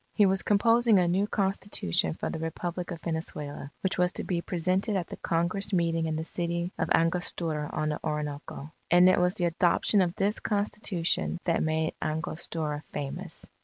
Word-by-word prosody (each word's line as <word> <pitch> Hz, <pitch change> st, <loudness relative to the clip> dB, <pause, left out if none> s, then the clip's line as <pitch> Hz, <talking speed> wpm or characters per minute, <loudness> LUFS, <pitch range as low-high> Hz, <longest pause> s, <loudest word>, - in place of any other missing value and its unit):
He 210 Hz, -, +6 dB
was 190 Hz, 0 st, +3 dB
composing 230 Hz, +1 st, +4 dB
a 180 Hz, -1 st, +3 dB
new 190 Hz, +4 st, +2 dB
Constitution 190 Hz, -, 0 dB
for -, -, -3 dB
the 160 Hz, -, -4 dB
Republic 175 Hz, +2 st, -4 dB
of 170 Hz, -3 st, -6 dB
Venezuela, 150 Hz, -4 st, -4 dB
which 190 Hz, -1 st, -1 dB
was 180 Hz, 0 st, +3 dB
to -, -, -3 dB
be 175 Hz, -2 st, -1 dB
presented 185 Hz, +5 st, 0 dB
at 180 Hz, -3 st, 0 dB
the -, -, -8 dB
Congress 170 Hz, +5 st, 0 dB
meeting 165 Hz, -2 st, +1 dB
in 160 Hz, -, -1 dB
the 160 Hz, -, -2 dB
city 170 Hz, +1 st, -2 dB
of -, -, 0 dB
Angostura 165 Hz, -2 st, 0 dB
on 155 Hz, 0 st, -1 dB
the 150 Hz, -, -2 dB
Orinoco. 150 Hz, 0 st, -4 dB, 0.2 s
And 175 Hz, +1 st, +7 dB
it 185 Hz, -, +5 dB
was 180 Hz, +2 st, +2 dB
the 180 Hz, -, +1 dB
adoption 175 Hz, +4 st, +2 dB
of 175 Hz, -1 st, 0 dB
this 205 Hz, +2 st, +1 dB
Constitution, 200 Hz, -5 st, 0 dB
that 170 Hz, -, +1 dB
made 160 Hz, 0 st, 0 dB
Angostura 155 Hz, -1 st, -3 dB
famous. 140 Hz, -2 st, -4 dB
170 Hz, 175 wpm, -28 LUFS, 160-190 Hz, 0.2 s, And